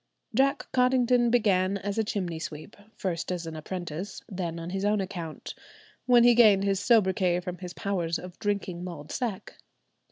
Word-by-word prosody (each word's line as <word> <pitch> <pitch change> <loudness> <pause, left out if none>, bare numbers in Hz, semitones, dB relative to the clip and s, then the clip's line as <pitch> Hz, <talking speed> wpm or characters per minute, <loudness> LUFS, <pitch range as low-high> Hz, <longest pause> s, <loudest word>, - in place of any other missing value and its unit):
Jack 275 +4 +2
Cottington 250 -1 +3
began 200 -5 +2
as 200 +2 -3
a - - +3
chimney 180 -6 -3
sweep, 155 -1 -7 0.2
first 175 -2 -3
as 175 -2 -3
an 160 -1 -6
apprentice, 175 +3 -6
then 175 -4 -4
on 165 +1 -6
his 195 +1 -2
own 210 +1 +2
account, 180 -5 -5 0.5
when 245 -1 +6
he 240 0 +7
gained 215 -5 +6
his 195 -1 +1
soubriquet 190 -5 +3
from 180 -1 -6
his 180 -1 -8
powers 175 -4 -1
of 180 +1 -10
drinking 200 -4 -2
mulled 155 -5 -7
sack. 230 -7 -4
190 Hz, 165 wpm, -27 LUFS, 175-215 Hz, 0.5 s, he